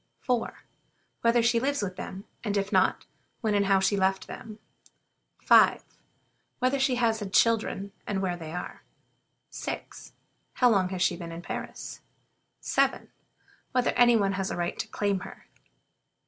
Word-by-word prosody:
4. 245 -3 -2 0.6
Whether 235 0 +3
she 235 0 +3
lives 275 -1 0
with 185 -2 -4
them, 190 +1 -7 0.2
and 205 -2 -1
if 200 0 -1
not, - - +2 0.4
when 220 -3 0
and 200 -1 +2
how 195 -1 +4
she 195 +2 +2
left 190 -1 +1
them? 215 -1 -9 0.9
5. - - +6 0.7
Whether 255 +2 +1
she 265 -1 +2
has 230 -2 +1
had 200 -3 -6
children, 210 -3 +2 0.2
and 200 -2 -1
where 185 -2 -1
they 160 -2 -8
are? 180 +1 -6 0.7
6. - - -7 0.4
How 250 -2 +4
long 195 -4 +3
she 180 0 +2
has 170 - -8
been 170 -1 -7
at 165 +1 -8
Paris? - - -6 0.6
7. - - +1 0.6
Whether 250 -1 +2
any 240 -1 +5
one 200 -3 +2
has 195 0 -2
a - - -4
right 175 0 -2
to - - -2
claim 200 -2 -1
her? - - -11
205 Hz, 160 wpm, -28 LUFS, 190-235 Hz, 0.9 s, 5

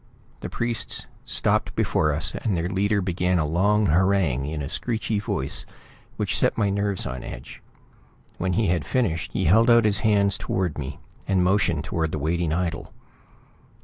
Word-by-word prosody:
The - - -6
priests 120 -1 -2 0.2
stopped - - +1
before 75 -1 +1
us 75 +2 -1
and 100 -6 -1
their 85 +1 -1
leader 100 +2 +1
began 90 0 0
a 80 - +1
long 100 +7 +2
harangue 85 -6 +2
in 75 -1 -4
a - - -4
screechy 110 - -1
voice 65 -9 -3 0.5
which - - 0
set - - +2
my 100 -3 +1
nerves 100 -1 -1
on 65 0 -5
edge. - - -9 0.8
When 90 0 0
he 110 +5 +1
had 85 -4 +1
finished 85 - -1
he - - 0
held 115 +8 +5
out 115 -1 +6
his 100 -2 +3
hands 100 -2 +2
toward 90 -6 -2
me, 70 0 -5 0.3
and 95 -2 +2
motioned 90 -5 +2
toward 80 -1 -2
the - - -1
waiting 80 +2 -1
idol. 85 0 -2
90 Hz, 170 wpm, -24 LUFS, 80-100 Hz, 0.8 s, out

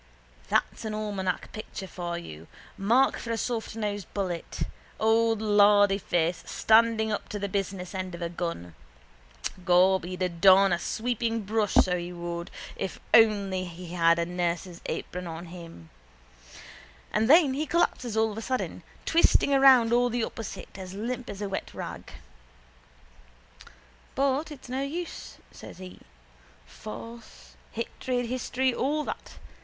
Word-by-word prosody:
That's - - 0
an 215 -1 -3
almanac 200 -4 -3
picture 215 -2 -7
for 175 -2 -5
you. 80 - -9 0.3
Mark 235 +7 +3
for 235 - -7
a 230 - 0
softnosed 215 -5 -3
bullet. 185 -4 -3 0.4
Old 225 0 +3
lardyface 205 -5 +3
standing 220 0 +4
up 210 - -3
to 210 - -4
the 200 0 -2
business 195 -2 -3
end 185 -2 -4
of 170 - -10
a - - 0
gun. 170 - -5 0.9
Gob, 185 +1 +4
he'd 185 +1 -4
adorn 185 +2 +5
a 170 - 0
sweepingbrush, 225 -1 -1
so 180 -1 -1
he 175 +1 -5
would, 170 0 -5 0.3
if 190 - -4
he - - +11
only 200 -4 -2
had 170 -1 +1
a 170 - 0
nurse's 175 0 -3
apron 180 0 -4
on 165 +1 -6
him. 165 - -11 1.2
And 220 +3 +2
then 305 -3 +7
he 300 +3 -2
collapses 250 -9 0
all 220 0 +3
of 215 - -6
a - - -6
sudden, 255 +2 -3 0.2
twisting 325 -3 +4
around 260 -4 +6
all 245 0 +4
the 240 -1 -1
opposite, 220 -3 -7
as 185 0 -7
limp 245 +4 -4
as 200 +1 -5
a - - -1
wet 195 - -5
rag. - - -7 2.0
—But 275 +3 +1
it's 285 -4 -10
no 260 +2 -2
use, 325 +5 -5
says - - -11
he. 185 0 -10 0.7
Force, 230 - -10 0.2
hatred, 245 +2 -2
history, 255 +1 0
all 295 +5 0
that. - - -7
205 Hz, 140 wpm, -27 LUFS, 180-235 Hz, 2.0 s, he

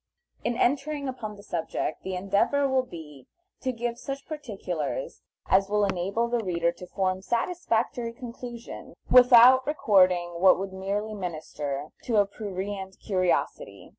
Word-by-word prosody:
In 240 0 -1
entering 280 +3 0
upon 225 -5 -5
the 200 - -14
subject, 165 -4 -3
the 190 -1 -4
endeavor 200 +10 +1
will 265 -1 +2
be 155 - -11 0.3
to 260 - -1
give 240 0 -4
such 275 0 -6
particulars 190 - -5 0.2
as 195 +1 +3
will 210 0 +2
enable 195 +5 -1
the 235 -1 -1
reader 170 -3 0
to 180 - -11
form 185 0 -1
satisfactory 235 - -1
conclusions, 240 -1 -9 0.2
without 250 +1 +8
recording 185 - +3
what 185 +1 +6
would 190 0 -5
merely 200 +3 -3
minister 155 -6 -5 0.2
to 230 -3 +1
a 205 - +5
prurient 195 -1 -6
curiosity. 190 - -1
205 Hz, 135 wpm, -27 LUFS, 185-245 Hz, 0.3 s, without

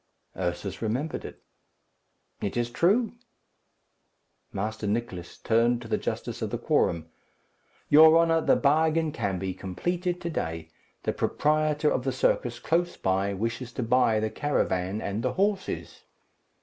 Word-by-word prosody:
Ursus 90 +2 -3
remembered 125 +8 -2
it. - - -10 1.0
"It 100 +3 -2
is 120 0 -1
true." 205 - +2 1.4
Master 105 +2 -3
Nicless 100 -5 -3
turned 115 +1 +2
to - - -9
the - - 0
justice - - -4
of - - -1
the - - -2
quorum. 80 -1 0 0.8
"Your 160 +2 +8
honour, 165 -1 +3
the - - +4
bargain 160 +2 +2
can 100 -7 -2
be 95 0 -3
completed 175 - -3
to 170 - -3
day. 80 - -4 0.3
The - - 0
proprietor 150 0 +1
of 125 - 0
the 135 - 0
circus 120 -1 0
close 175 +6 0
by 95 +1 0
wishes 115 +4 -3
to 125 - -2
buy 115 -2 +3
the 110 0 -1
caravan 100 -8 -1
and 100 +2 -3
the - - -1
horses." 195 0 -2
120 Hz, 140 wpm, -27 LUFS, 100-155 Hz, 1.4 s, Your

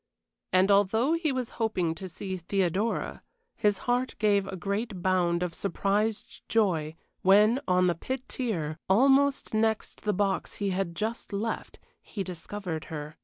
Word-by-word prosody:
And 185 +2 +4
although 220 +8 +3
he 330 -3 +1
was 255 -3 -2
hoping 185 -7 +1
to 185 +3 -8
see 190 +2 -5
Theodora, 190 +4 -1 0.3
his 210 -3 +2
heart 250 +1 0
gave 205 -2 +2
a 195 - -5
great 200 +1 -3
bound 180 -2 +2
of 175 -2 -3
surprised 205 +3 -1
joy 170 -8 +1 0.3
when, 210 +6 +5
on 180 0 +4
the 175 - +3
pit 260 +10 -5
tier, 165 - -3
almost 270 +7 +4
next 220 0 0
the 210 - 0
box 195 0 -1
he 200 -1 -1
had 185 -2 -2
just 225 +4 -3
left, 220 +3 -3 0.2
he 200 - -5
discovered 180 -1 -5
her. 150 -1 -7
200 Hz, 150 wpm, -28 LUFS, 180-225 Hz, 0.3 s, when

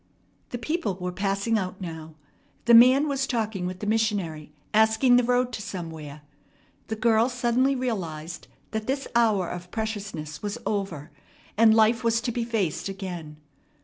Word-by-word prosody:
The 245 - -4
people 240 - -2
were 180 0 -4
passing 200 +4 0
out 185 0 -5
now. 160 -3 -7 0.5
The 235 - +5
man 255 +5 +7
was 275 -2 -1
talking 215 -6 -2
with 185 0 -6
the - - -3
missionary, 205 -9 -1 0.2
asking 220 +4 +5
the 245 - +5
road 250 +1 +1
to 220 - -4
somewhere. 160 -6 -7 0.6
The 220 - -3
girl 225 +2 +3
suddenly 250 +2 +1
realized 175 -10 -4 0.2
that 220 0 -3
this 270 +1 -1
hour 215 -6 +3
of 175 +1 -7
preciousness 200 -9 -5
was 205 -1 -3
over, 180 -7 -3 0.4
and 220 0 +6
life 225 +2 +4
was 230 0 +2
to 240 - -2
be 235 0 -2
faced 210 -7 -1
again. 175 -6 -6
215 Hz, 155 wpm, -26 LUFS, 180-235 Hz, 0.6 s, man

